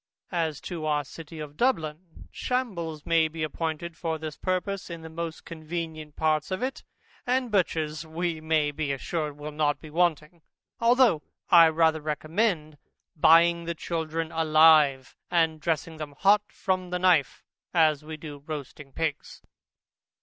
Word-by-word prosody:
As 160 Hz, -4 st, -1 dB
to 165 Hz, -4 st, -5 dB
our 150 Hz, -1 st, +1 dB
City 160 Hz, +2 st, -10 dB
of 150 Hz, -1 st, -8 dB
Dublin, 165 Hz, -9 st, -2 dB
shambles 170 Hz, -, -3 dB
may 165 Hz, -1 st, +3 dB
be 160 Hz, 0 st, -5 dB
appointed 160 Hz, +1 st, -3 dB
for 165 Hz, -2 st, -2 dB
this 155 Hz, -1 st, -6 dB
purpose, 185 Hz, +1 st, -2 dB
in 170 Hz, -1 st, -7 dB
the 160 Hz, -, -9 dB
most 165 Hz, 0 st, -5 dB
convenient 160 Hz, -2 st, -6 dB
parts 155 Hz, -1 st, +1 dB
of 185 Hz, +5 st, -3 dB
it, 265 Hz, +1 st, -3 dB, 0.4 s
and 250 Hz, -1 st, +1 dB
butchers 160 Hz, -5 st, 0 dB
we 165 Hz, 0 st, -3 dB
may 155 Hz, -2 st, +1 dB
be 145 Hz, -1 st, -2 dB
assured 150 Hz, +2 st, -3 dB
will 150 Hz, +1 st, -6 dB
not 150 Hz, -1 st, 0 dB
be 155 Hz, -, -12 dB
wanting; 165 Hz, -1 st, 0 dB, 0.4 s
although 235 Hz, -, +4 dB, 0.3 s
I 170 Hz, -2 st, +9 dB
rather 160 Hz, -1 st, +2 dB
recommend 155 Hz, 0 st, -1 dB, 0.4 s
buying 170 Hz, +2 st, +5 dB
the 170 Hz, 0 st, -3 dB
children 160 Hz, 0 st, -3 dB
alive, 155 Hz, -4 st, +4 dB
and 160 Hz, -2 st, +1 dB
dressing 160 Hz, 0 st, -2 dB
them 150 Hz, -2 st, -7 dB
hot 205 Hz, +4 st, +5 dB
from 185 Hz, -1 st, -2 dB
the 180 Hz, -, -1 dB
knife, 180 Hz, -6 st, +2 dB, 0.3 s
as 155 Hz, -3 st, +3 dB
we 155 Hz, 0 st, -7 dB
do 150 Hz, -2 st, -9 dB
roasting 145 Hz, -2 st, -7 dB
pigs. 160 Hz, -3 st, -4 dB
160 Hz, 150 wpm, -27 LUFS, 155-170 Hz, 0.4 s, I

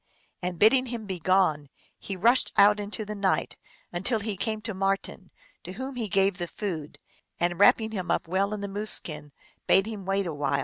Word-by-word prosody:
and 180 Hz, -1 st, -4 dB
bidding 255 Hz, +7 st, +4 dB
him 235 Hz, -2 st, -5 dB
begone, 185 Hz, -6 st, +1 dB, 0.3 s
he 195 Hz, -, -6 dB
rushed 235 Hz, +7 st, +4 dB
out 205 Hz, +1 st, +6 dB
into 210 Hz, +1 st, -2 dB
the 210 Hz, -, -5 dB
night, 200 Hz, -2 st, 0 dB, 0.4 s
until 220 Hz, +7 st, 0 dB
he 210 Hz, -1 st, -4 dB
came 215 Hz, +3 st, -2 dB
to 220 Hz, 0 st, -5 dB
Mar 195 Hz, +1 st, +1 dB
ten, -, -, -11 dB, 0.3 s
to 185 Hz, -, -8 dB
whom 260 Hz, +5 st, -6 dB
he 230 Hz, -4 st, -3 dB
gave 195 Hz, 0 st, +2 dB
the 175 Hz, -, -3 dB
food, 165 Hz, -7 st, -6 dB, 0.4 s
and, 175 Hz, 0 st, -1 dB
wrapping 220 Hz, +2 st, +4 dB
him 185 Hz, -4 st, -5 dB
up -, -, 0 dB
well 195 Hz, +4 st, 0 dB
in 210 Hz, -1 st, -4 dB
the 200 Hz, -, -3 dB
moose 205 Hz, +2 st, 0 dB
skin, 150 Hz, -2 st, +1 dB, 0.4 s
bade 195 Hz, +1 st, +4 dB
him 215 Hz, -3 st, -6 dB
wait 195 Hz, +1 st, -1 dB
a 170 Hz, -, -4 dB
while. 145 Hz, -1 st, -1 dB
195 Hz, 205 wpm, -26 LUFS, 180-215 Hz, 0.4 s, out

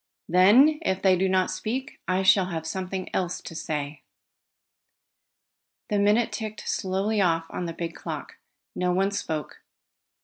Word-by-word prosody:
Then, 220 Hz, -, +6 dB
if 190 Hz, -, -1 dB
they 190 Hz, -1 st, +5 dB
do 190 Hz, +1 st, +1 dB
not 185 Hz, 0 st, +2 dB
speak, 245 Hz, +8 st, -4 dB
I 185 Hz, +1 st, +1 dB
shall 190 Hz, -1 st, +5 dB
have 165 Hz, -3 st, -4 dB
something 185 Hz, +2 st, -4 dB
else 180 Hz, -1 st, -1 dB
to -, -, -9 dB
say." 150 Hz, -2 st, -4 dB, 1.9 s
The 205 Hz, -, +1 dB
minute 210 Hz, +3 st, +3 dB
ticked 215 Hz, -2 st, -6 dB
slowly 195 Hz, +3 st, 0 dB
off 165 Hz, -3 st, +2 dB
on 180 Hz, -, -4 dB
the 165 Hz, -, -4 dB
big 165 Hz, 0 st, -5 dB
clock. -, -, -7 dB, 0.4 s
No 180 Hz, 0 st, 0 dB
one 195 Hz, +2 st, +1 dB
spoke. 160 Hz, -6 st, -4 dB
185 Hz, 145 wpm, -26 LUFS, 175-205 Hz, 1.9 s, Then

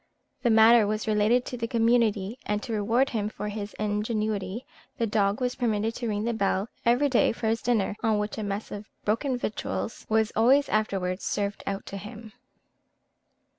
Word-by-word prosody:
The 245 Hz, -, +2 dB
matter 225 Hz, 0 st, +6 dB
was 215 Hz, +1 st, -2 dB
related 215 Hz, +4 st, +3 dB
to 250 Hz, -, -5 dB
the 230 Hz, -1 st, -2 dB
community; 230 Hz, -2 st, +1 dB
and 210 Hz, 0 st, -1 dB
to 230 Hz, -, -4 dB
reward 225 Hz, +6 st, +1 dB
him 210 Hz, -3 st, -1 dB
for 210 Hz, -1 st, -5 dB
his 205 Hz, 0 st, -6 dB
ingenuity, 210 Hz, 0 st, -2 dB, 0.3 s
the 230 Hz, -, +1 dB
dog 205 Hz, -2 st, +1 dB
was 250 Hz, -1 st, 0 dB
permitted 225 Hz, -3 st, 0 dB
to 240 Hz, -, -3 dB
ring 210 Hz, -1 st, -1 dB
the 235 Hz, +1 st, 0 dB
bell 200 Hz, 0 st, 0 dB
every 245 Hz, +5 st, +3 dB
day 255 Hz, -4 st, +3 dB
for 225 Hz, -, -6 dB
his 225 Hz, +1 st, +1 dB
dinner, 220 Hz, -4 st, +1 dB
on 220 Hz, -2 st, +2 dB
which 210 Hz, +1 st, -3 dB
a -, -, -3 dB
mess 200 Hz, +1 st, -4 dB
of 205 Hz, +1 st, -7 dB, 0.2 s
broken 250 Hz, +5 st, 0 dB
victuals 220 Hz, -1 st, -4 dB
was 220 Hz, 0 st, +2 dB
always 265 Hz, +6 st, +4 dB
afterwards 195 Hz, -3 st, -1 dB
served 200 Hz, -1 st, -2 dB
out 195 Hz, 0 st, -3 dB
to 195 Hz, -, -6 dB
him. 215 Hz, +2 st, -10 dB
220 Hz, 180 wpm, -27 LUFS, 205-235 Hz, 0.3 s, matter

